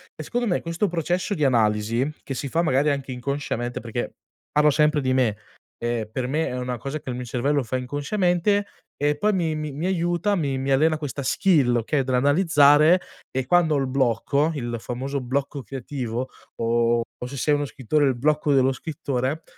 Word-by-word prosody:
E -, -, -7 dB
secondo 245 Hz, 0 st, -2 dB
me, 180 Hz, -, 0 dB
questo 170 Hz, +5 st, -1 dB
processo 175 Hz, +3 st, -1 dB
di 155 Hz, -, -1 dB
analisi, 115 Hz, 0 st, +2 dB
che 135 Hz, -, -5 dB
si 135 Hz, +2 st, -4 dB
fa 165 Hz, +5 st, +1 dB
magari 145 Hz, -1 st, +2 dB
anche 140 Hz, -2 st, -2 dB
inconsciamente, 125 Hz, -1 st, -3 dB
perché, 120 Hz, +1 st, -4 dB, 0.4 s
parlo 150 Hz, 0 st, +4 dB
sempre 150 Hz, +1 st, +3 dB
di 130 Hz, -1 st, +1 dB
me, 120 Hz, -5 st, +2 dB, 0.4 s
ehm, 120 Hz, -2 st, -2 dB
per 125 Hz, +2 st, -2 dB
me 155 Hz, +5 st, 0 dB
è 125 Hz, -, -4 dB
una 125 Hz, -1 st, -3 dB
cosa 140 Hz, +5 st, -4 dB
che 130 Hz, -, -6 dB
il -, -, -4 dB
mio 125 Hz, 0 st, -5 dB
cervello 135 Hz, +4 st, 0 dB
fa 130 Hz, +1 st, -2 dB
inconsciamente, 175 Hz, +9 st, 0 dB, 0.3 s
e 145 Hz, +1 st, +1 dB
poi 210 Hz, +8 st, +1 dB
mi 170 Hz, -4 st, 0 dB
mi 155 Hz, -1 st, -4 dB
mi 150 Hz, +5 st, -4 dB
aiuta, 175 Hz, +1 st, +1 dB
mi 140 Hz, -7 st, -1 dB
mi 135 Hz, +1 st, -2 dB
allena 155 Hz, +4 st, +3 dB
questa 145 Hz, -2 st, -5 dB
skill 135 Hz, -3 st, +3 dB
okay, 120 Hz, +5 st, +1 dB
dell'analizzare, 145 Hz, +4 st, +5 dB, 0.3 s
e 130 Hz, -1 st, -2 dB
quando 165 Hz, 0 st, +3 dB
ho -, -, +2 dB
il 135 Hz, -1 st, 0 dB
blocco 135 Hz, +4 st, +1 dB
il 120 Hz, -4 st, -3 dB
famoso 130 Hz, +4 st, -4 dB
blocco 135 Hz, +3 st, -2 dB
creativo, 130 Hz, -2 st, -4 dB, 0.3 s
o 115 Hz, 0 st, +2 dB, 0.2 s
o -, -, -3 dB
se 140 Hz, +2 st, -7 dB
sei 150 Hz, +3 st, +2 dB
uno 145 Hz, 0 st, +1 dB
scrittore, 145 Hz, +2 st, 0 dB
il 130 Hz, -, +1 dB
blocco 150 Hz, +2 st, +2 dB
dello 135 Hz, -1 st, +4 dB
scrittore, 140 Hz, +1 st, -3 dB
140 Hz, 190 wpm, -24 LUFS, 125-155 Hz, 0.4 s, dell'analizzare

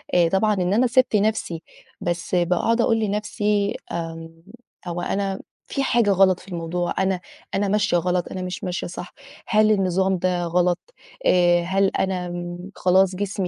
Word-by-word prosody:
آآ 175 Hz, -2 st, +4 dB
طبعًا 200 Hz, +4 st, +2 dB
إن 180 Hz, 0 st, 0 dB
أنا 245 Hz, +4 st, +3 dB
سِبت 250 Hz, -1 st, +3 dB
نَفْسي، 205 Hz, -6 st, 0 dB, 0.4 s
بس 175 Hz, +1 st, -2 dB
باقعُد 180 Hz, +7 st, +2 dB
أقول 225 Hz, -1 st, +2 dB
لنَفْسي 210 Hz, -1 st, 0 dB, 0.2 s
آمم 165 Hz, -1 st, -5 dB, 0.6 s
هو 175 Hz, 0 st, -3 dB
أنا 195 Hz, 0 st, -2 dB, 0.3 s
في 275 Hz, -, -2 dB
حاجة 235 Hz, -6 st, +3 dB
غلط 190 Hz, -1 st, +4 dB
في 185 Hz, -, -17 dB
الموضوع، 175 Hz, 0 st, -2 dB
أنا 190 Hz, -1 st, +1 dB, 0.4 s
أنا 200 Hz, +1 st, +1 dB
ماشية 200 Hz, -2 st, +2 dB
غلط، 180 Hz, +1 st, 0 dB
أنا 185 Hz, -, -4 dB
مش 180 Hz, 0 st, -5 dB
ماشية 180 Hz, -1 st, -3 dB
صح، 180 Hz, 0 st, -8 dB, 0.3 s
هل 215 Hz, 0 st, +4 dB
النظام 190 Hz, -1 st, +2 dB
ده 180 Hz, 0 st, 0 dB
غلط، 175 Hz, +1 st, +1 dB, 0.5 s
آآ 175 Hz, -1 st, +4 dB
هل 195 Hz, +3 st, +2 dB
أنا 185 Hz, -2 st, -1 dB
م 175 Hz, +1 st, -6 dB
خلاص 185 Hz, +1 st, +3 dB
جسمي 195 Hz, -1 st, -2 dB
185 Hz, 160 wpm, -23 LUFS, 175-205 Hz, 0.6 s, آآ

